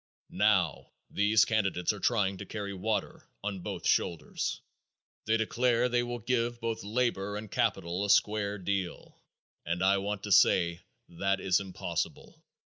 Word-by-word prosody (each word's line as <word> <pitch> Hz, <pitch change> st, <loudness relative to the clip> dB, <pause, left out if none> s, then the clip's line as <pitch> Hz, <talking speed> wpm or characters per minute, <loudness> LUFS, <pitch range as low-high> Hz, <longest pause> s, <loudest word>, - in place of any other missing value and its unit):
Now, -, -, +1 dB, 0.2 s
these 105 Hz, +1 st, +4 dB
candidates 95 Hz, -4 st, 0 dB
are 105 Hz, -, -8 dB
trying 100 Hz, -3 st, +1 dB
to -, -, -6 dB
carry 100 Hz, -2 st, -5 dB
water 105 Hz, +3 st, -3 dB
on 100 Hz, -2 st, -3 dB
both -, -, -6 dB
shoulders. 85 Hz, -2 st, 0 dB, 0.7 s
They 110 Hz, +1 st, +2 dB
declare 120 Hz, +2 st, +2 dB
they 120 Hz, 0 st, +2 dB
will 120 Hz, 0 st, -3 dB
give 120 Hz, 0 st, -1 dB
both 115 Hz, -3 st, -3 dB
labor 105 Hz, -2 st, -1 dB
and 105 Hz, -1 st, -8 dB
capital 85 Hz, +3 st, 0 dB
a 100 Hz, -, -2 dB
square 105 Hz, 0 st, +2 dB
deal, 95 Hz, -2 st, -4 dB, 0.4 s
and 85 Hz, +2 st, -2 dB
I 100 Hz, +1 st, +4 dB
want 100 Hz, 0 st, -3 dB
to 105 Hz, -, -5 dB
say 85 Hz, -2 st, +4 dB, 0.3 s
that 95 Hz, +3 st, -1 dB
is 95 Hz, -1 st, +2 dB
impossible. 90 Hz, -3 st, -5 dB
100 Hz, 145 wpm, -30 LUFS, 95-110 Hz, 0.7 s, these